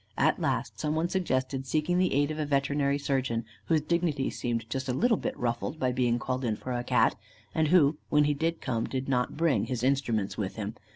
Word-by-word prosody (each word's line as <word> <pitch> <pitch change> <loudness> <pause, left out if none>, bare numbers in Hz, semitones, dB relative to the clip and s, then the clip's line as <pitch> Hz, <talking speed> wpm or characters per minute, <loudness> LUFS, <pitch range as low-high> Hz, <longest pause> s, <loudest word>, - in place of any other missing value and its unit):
At - - +2
last, - - -1
some 150 0 -1
one 165 +2 0
suggested 135 -7 -1
seeking 155 +5 +1
the 185 -1 +2
aid 145 +2 +2
of 155 - -5
a 155 - 0
veterinary 140 0 +1
surgeon, 130 -5 -1 0.2
whose 160 -2 +2
dignity 155 -3 0
seemed 115 -2 -2
just 130 +2 -3
a - - +1
little 235 - +3
bit - - -4
ruffled 120 +5 -2
by 130 -1 +1
being 125 -1 +1
called 130 +2 -2
in 110 -3 0
for 130 - -7
a 120 0 -2
Cat, - - +3 0.4
and 160 -1 +2
who, 150 -3 +4
when 150 0 +4
he 150 0 +2
did 165 +3 -1
come, 115 -3 -1
did 130 0 -3
not 125 -1 0
bring 145 -11 +2
his 120 -1 -3
instruments 120 -8 0
with 95 -2 -3
him. 105 -1 -4
135 Hz, 220 wpm, -29 LUFS, 125-155 Hz, 0.4 s, who